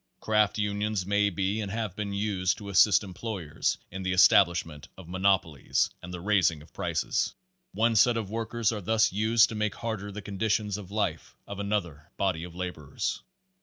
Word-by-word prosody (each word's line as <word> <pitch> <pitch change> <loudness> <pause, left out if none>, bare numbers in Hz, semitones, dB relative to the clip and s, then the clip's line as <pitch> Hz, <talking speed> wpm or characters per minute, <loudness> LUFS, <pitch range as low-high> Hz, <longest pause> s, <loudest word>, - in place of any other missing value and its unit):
Craft 105 -1 +2
unions 105 -1 -1
may 100 +1 +2
be 100 +3 -1
and 100 - -4
have 110 -4 -3
been 105 -1 -3
used 100 -2 0
to 100 -2 -8
assist 100 +1 +5
employers 95 -4 -3
in 95 - -6
the 90 0 -1
establishment 85 -5 +4
of 95 -3 -11
monopolies 95 -6 +1
and 90 - -9
the 90 - -6
raising 90 -5 +2
of - - -21
prices. - - -1 0.4
One 115 +1 +2
set 115 +2 +5
of 105 -3 -4
workers 115 0 -1
are 105 -2 -4
thus 110 +2 +2
used 110 +2 +4
to - - -6
make 105 -1 -1
harder 110 -3 -4
the 105 +1 -7
conditions 105 +1 -1
of 95 -3 -10
life 105 +1 -2
of 100 0 -7
another 90 -7 -3
body 95 -5 0
of 85 -1 -9
laborers. 90 -6 -4
100 Hz, 175 wpm, -28 LUFS, 90-105 Hz, 0.4 s, assist